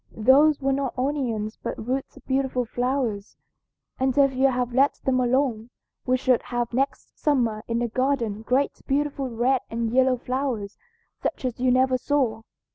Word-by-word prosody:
Those 275 +7 +5
were 275 -1 +1
not 270 -2 -2
onions 250 -6 -2
but - - -4
roots 265 +1 -3
of - - -16
beautiful 265 -2 0
flowers, 245 -4 -2 0.6
and 265 +1 0
if 275 -1 +4
you 260 +1 +3
had 250 -2 -1
let 275 +3 +3
them 255 -1 +2
alone 245 -2 0 0.4
we 255 0 +3
should 255 -1 +2
have 240 -1 -3
next 270 +3 -2
summer 240 -8 +1
in 230 - -1
the 240 0 0
garden 235 -3 -1
great 255 +5 0
beautiful 280 -1 -1
red 245 +2 +1
and 230 0 -2
yellow 260 0 +4
flowers 245 -5 -3 0.4
such - - -3
as 245 -2 -3
you 255 0 +2
never 255 0 +3
saw.' 250 -6 0
255 Hz, 165 wpm, -25 LUFS, 235-270 Hz, 0.6 s, Those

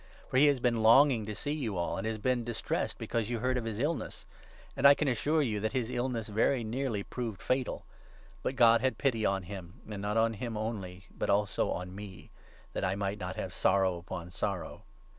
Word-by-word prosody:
For - - 0
he 145 +3 +7
has 140 -3 +3
been 120 -2 +1
longing 115 0 +6
to 105 - -4
see 145 - -2
you 125 -11 -2
all, 85 - -1
and 95 +3 -3
has 110 -1 -2
been 125 +3 +1
26 120 - -6
distressed 115 -1 -2
because 115 -2 -2
you 120 - -1
heard 130 +3 0
of 125 -2 -2
his 110 -2 -3
illness. 145 +5 -2 0.5
And 135 +1 +6
I 140 - +8
can 150 - -1
assure 145 +5 +2
27 115 -6 -1
you 105 - -1
that 110 +1 -2
his 125 -2 -1
illness 120 -3 -2
very 115 +4 +1
nearly 115 -2 -2
proved 115 -4 -5
fatal. 130 0 -1 0.6
But 130 - -2
God 115 -2 +6
had 130 +1 +1
pity 115 -6 +1
on 95 -1 0
him, 90 -1 -9
and 105 -2 -5
not 105 +2 -1
on 115 0 +3
him 115 0 -4
only 100 -4 -5
but - - -2
also 100 0 +2
on 90 +1 -4
me, 100 -2 -10 0.4
that - - -2
I 95 0 +1
might 100 +1 -2
not 90 -1 -4
have 90 - -4
sorrow 95 -1 +2
upon 85 0 -7
sorrow. 100 0 -3
110 Hz, 220 wpm, -31 LUFS, 100-125 Hz, 0.6 s, I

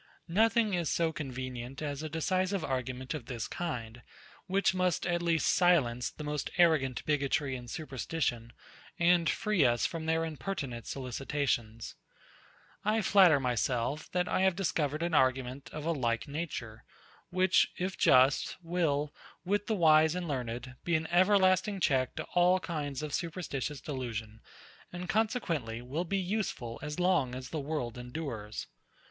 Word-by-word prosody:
Nothing 220 +3 +3
is 175 -4 0
so 165 -1 +1
convenient 130 -2 -5
as 145 -2 -3
a 155 - -4
decisive 185 +4 0
argument 130 0 -3
of 140 -6 -6
this 120 -4 -4
kind, 120 -9 -5 0.5
which 195 +1 +2
must 185 -2 0
at 175 0 0
least 165 -2 +1
silence 135 -10 +3
the 150 - -9
most 150 -1 -2
arrogant 155 -8 +3
bigotry 140 -2 0
and 120 -1 -8
superstition, 130 -4 -3 0.5
and 170 -2 +4
free 210 -7 +1
us 120 -2 +3
from 160 -1 -3
their 160 0 +1
impertinent 140 - -5
solicitations. 125 -3 -2 0.9
I 215 +1 +1
flatter 185 -7 +6
myself, 125 +3 -1
that 180 0 0
I - - +1
have 190 -2 +3
discovered 155 -4 -1
an 170 -1 -1
argument 130 -1 +1
of 150 0 -6
a 170 - +1
like 120 -7 -1
nature, 140 -7 -5 0.5
which, 185 +1 +3
if 185 +1 -2
just, 130 +2 +4
will, 155 -4 0 0.3
with 205 +2 0
the 220 - +1
wise 160 -2 +5
and 180 -1 -3
learned, 125 -2 -4
be 170 - +1
an 160 0 0
everlasting 185 +2 +4
check 130 -6 +1
to - - -3
all 180 +1 +4
kinds 150 -5 -4
of 150 -2 -4
superstitious 150 -5 -3
delusion, 115 -6 -5 0.5
and 180 0 -6
consequently, 175 - -1
will 135 +8 -3
be 195 +3 -1
useful 185 - -3
as 150 +3 -5
long 160 -9 +2
as 130 0 -7
the 160 - -2
world 135 -5 -3
endures. 120 -5 -5
150 Hz, 150 wpm, -31 LUFS, 130-175 Hz, 0.9 s, flatter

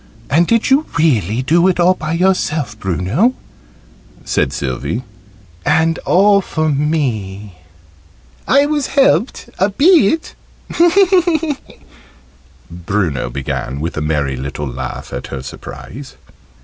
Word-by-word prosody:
"And 165 +4 +3
did 230 +2 +1
you 285 +4 +3
really 125 - +1
do 170 +6 +3
it 185 -1 +1
all 175 +2 +5
by 155 -3 -4
yourself, 165 - 0
Bruno?" 95 - 0 0.9
said - - 0
Sylvie. 70 - -3 0.6
"And 165 +1 +2
all 200 +2 +4
for 155 -4 -2
me?" 110 - -2 0.9
"I 280 +2 +4
was 295 -2 -1
helped 270 -2 +2
a 190 +3 +3
bit," 315 - +3 2.4
Bruno 90 -5 -2
began, 70 0 -4
with 80 +3 -4
a 80 - -3
merry 75 -3 -1
little 70 +2 -5
laugh 65 0 -6
at - - -5
her 65 -2 -6
surprise. 130 - -10
140 Hz, 110 wpm, -16 LUFS, -, 2.4 s, all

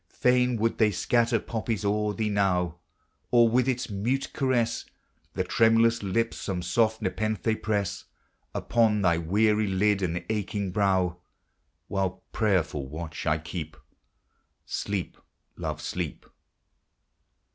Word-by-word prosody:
Fain 125 -1 +2
would 115 +1 0
they 110 -2 +5
scatter 115 +4 +2
poppies 110 -2 -3
o'er 105 0 +1
thee 110 -2 -1
now; 90 -4 +1 0.5
Or, 120 -1 +6
with 125 +3 +2
its 125 0 -1
mute 120 +8 -1
caress, 125 -5 0 0.5
The - - +1
tremulous 115 +1 +3
lip 115 +4 0
some 90 -3 -4
soft 110 +5 +1
nepenthe 110 +2 -1
press 105 -3 -1 0.5
Upon 110 -3 +2
thy 85 -2 +3
weary 105 +5 +2
lid 100 +1 +2
and 90 -1 -2
aching 100 -2 -2
brow; 95 -3 +1 0.7
While 95 -2 -2
prayerful 90 -10 0
watch 80 +2 -6
I 75 +1 +3
keep, 80 0 -6 0.9
Sleep, 100 -3 -3 0.4
love, - - -4
sleep - - -4
105 Hz, 120 wpm, -27 LUFS, 95-115 Hz, 0.9 s, Or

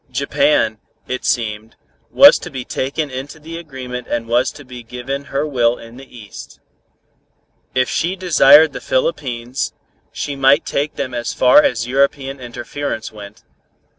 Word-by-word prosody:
Japan, 140 -5 +1 0.3
it 125 0 -4
seemed, 110 -2 -2 0.3
was 285 - +7
to - - -8
be 130 -5 -6
taken 140 +2 -3
into 135 +4 -7
the 165 +2 -8
agreement 130 -6 -7
and 115 -1 -3
was 120 +3 +1
to 145 -1 -13
be 125 -1 -10
given 125 +4 -6
her 140 +2 -2
will 120 -5 +1
in 115 +1 -13
the 130 -2 -13
East. 105 -3 -11 1.2
If 130 0 +2
she 175 +3 -1
desired 160 -4 +6
the - - -7
Philippines, 130 - -2 0.4
she 145 - -4
might 135 +3 +3
take 145 +2 -2
them 125 - -4
as 120 -1 -3
far 125 +3 +6
as 115 -5 0
European 135 +1 0
interference 120 0 -5
went. 105 +1 -12
130 Hz, 150 wpm, -18 LUFS, 120-145 Hz, 1.2 s, was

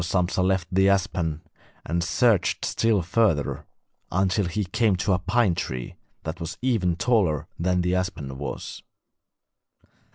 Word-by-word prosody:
So 85 +3 0
Sampsa 90 +1 +1
left 95 -1 +1
the 95 +1 +4
aspen 90 -5 0 0.4
and 85 +2 -1
searched 110 +1 +2
still 110 -5 +1
further, 85 -5 +1 0.4
until 95 +3 +1
he 105 +5 -1
came 105 +2 +2
to 95 +2 +1
a 90 - +1
pine 100 +2 +2
tree 65 -6 -4 0.3
that 80 +2 -5
was 85 -2 -5
even 105 -9 +1
taller 85 - +1
than 90 +1 +1
the 90 +1 0
aspen 85 -8 -3
was. 70 - -6
90 Hz, 140 wpm, -25 LUFS, 85-100 Hz, 0.4 s, the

